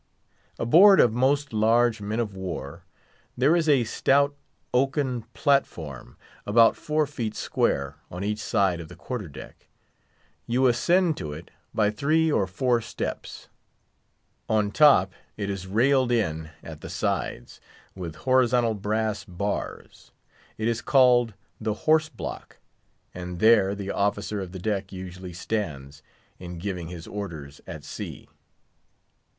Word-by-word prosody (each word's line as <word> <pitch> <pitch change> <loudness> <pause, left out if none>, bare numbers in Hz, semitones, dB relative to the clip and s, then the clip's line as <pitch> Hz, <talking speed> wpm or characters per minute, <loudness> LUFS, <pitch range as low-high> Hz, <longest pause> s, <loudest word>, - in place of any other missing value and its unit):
Aboard 190 - +7
of 115 - +5
most 140 +3 +1
large 115 +1 +3
men 105 +3 -3
of 110 -4 -2
war 95 -3 -6 0.5
there 140 +6 +4
is 165 -2 +1
a 135 -4 +5
stout 140 +5 +2 0.4
oaken 130 -1 +1
platform, 85 - -1 0.3
about 115 +2 +5
four 155 0 0
feet 120 -7 -4
square, 70 -1 -1
on 90 +2 -6
each 105 +1 -2
side 95 -4 +1
of 85 - -8
the - - -12
quarter 120 -8 -5
deck. 70 - -12 0.8
You 125 +3 +2
ascend 160 +8 +3
to 75 -1 -5
it 80 +3 -10 0.2
by 105 -1 +2
three 155 +8 +2
or 100 -9 +1
four 120 +5 +1
steps; - - -6 1.0
on 105 -2 +1
top, 120 - +5 0.2
it 100 -2 -2
is 95 -1 -6
railed 125 +5 +3
in 80 -9 0
at 80 -2 -9
the - - -8
sides, - - -3 0.3
with 85 -5 -7
horizontal 125 -3 +3
brass 110 +1 -2
bars. 100 +2 -5 0.5
It 110 - -1
is 115 -1 0
called 125 -5 +4 0.2
the 110 -1 -2
Horse 155 0 +4
Block; - - -8 0.6
and 90 0 -6
there 100 -1 +4
the 100 -1 -4
officer 100 0 -1
of 90 -2 -7
the 95 - -7
deck 100 0 -2
usually 95 -1 -8
stands, 75 -8 -4 0.4
in 90 -1 -8
giving 90 -2 -4
his 85 -1 -8
orders 80 -9 -7
at - - -8
sea. - - -8
110 Hz, 135 wpm, -26 LUFS, 95-125 Hz, 1.0 s, Aboard